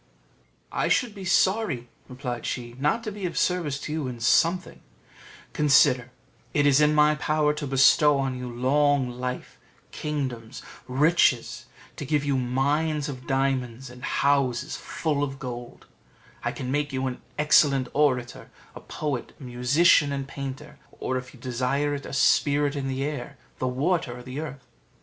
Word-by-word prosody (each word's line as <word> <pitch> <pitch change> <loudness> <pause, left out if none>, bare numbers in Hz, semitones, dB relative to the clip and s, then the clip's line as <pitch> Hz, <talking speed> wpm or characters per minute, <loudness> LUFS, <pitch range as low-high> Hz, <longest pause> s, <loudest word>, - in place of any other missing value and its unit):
"I - - 0
should 245 -5 +1
be 195 -2 -8
sorry," 185 - +1 0.2
replied 125 -2 -5
she, 120 -1 -4
"not 150 - +1
to 215 - -4
be 200 -2 -4
of 170 - -6
service 165 -7 0
to - - -5
you 155 -3 -2
in 125 -2 -6
something; 170 +9 +2 0.7
consider, 140 -4 +4 0.5
it 145 -1 +3
is 145 0 +5
in 150 0 +4
my 150 0 +5
power 150 0 +1
to 150 -1 -5
bestow 135 +2 +5
on 135 -1 -1
you 125 0 -6
long 135 +1 +2
life, 125 +1 -6 0.3
kingdoms, 130 -6 -4 0.2
riches: 135 -2 +2 0.3
to - - -5
give 145 0 0
you 140 -1 +1
mines 145 +4 0
of 130 -2 -8
diamonds, 135 -2 -1
and 125 0 -13
houses 140 -1 +1
full 150 -3 -2
of 135 -1 -2
gold; 120 -2 -8 0.6
I - - 0
can 130 -1 -5
make 145 +1 -1
you 130 0 -2
an 130 -1 -4 0.2
excellent 145 -3 +4
orator, 125 -4 0 0.4
poet, 145 -5 -4
musician, 140 +5 +3
and 135 -1 -3
painter; 140 +2 -7
or, 130 - -4
if 125 0 -5
you 130 - -17
desire 130 +4 -1
it, 140 -1 -5
a - - -8
spirit 145 +1 +3
of 140 -1 -3
the 135 0 -2
air, 145 -4 -5 0.2
the 130 - -1
water, 135 0 -1
or 125 - -10
the 130 +3 -6
earth." 135 -4 -7
140 Hz, 160 wpm, -25 LUFS, 125-150 Hz, 0.7 s, is